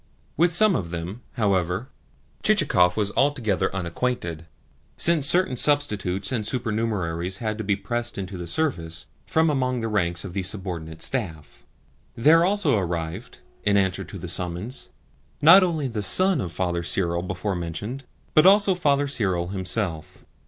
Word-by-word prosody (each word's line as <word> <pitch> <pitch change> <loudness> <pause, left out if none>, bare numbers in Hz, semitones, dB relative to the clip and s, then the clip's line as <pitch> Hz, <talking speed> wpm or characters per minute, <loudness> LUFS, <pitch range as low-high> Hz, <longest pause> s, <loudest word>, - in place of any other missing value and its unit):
With 170 +1 +3
some 205 +2 +6
of 85 - -3
them, 85 +7 -6
however, 95 +1 -1 0.5
Chichikov 140 - +3
was 105 -2 0
altogether 125 -9 +1
unacquainted, 85 -3 -3 0.5
since 160 -5 +3
certain 180 -4 +2
substitutes 105 -10 0
and 120 -4 -1
supernumeraries 105 -7 -2
had 110 -1 -4
to - - -3
be 100 0 +1
pressed 120 +4 -4
into 95 -1 -5
the 90 -1 -6
service 85 - -2 0.2
from 160 0 +2
among 130 -3 -1
the 115 - -2
ranks 85 -5 -1
of 90 - -8
the 95 - -2
subordinate 90 -5 -3
staff. 85 - -3 0.5
There 155 +8 +5
also 180 - +1
arrived, 85 +4 -5 0.2
in 100 0 +2
answer 95 0 0
to - - -9
the 90 0 -7
summons, 90 +7 -3 0.5
not 170 +6 +8
only 165 -6 0
the 115 -4 -4
son 180 - +5
of 85 - -5
Father 85 +1 -2
Cyril 85 0 0
before 95 +3 -3
mentioned, 100 +10 -5 0.3
but 155 +4 +6
also 200 0 +5
Father 145 -5 +1
Cyril 95 -10 0
himself. 95 -3 -3
105 Hz, 150 wpm, -24 LUFS, 90-135 Hz, 0.5 s, not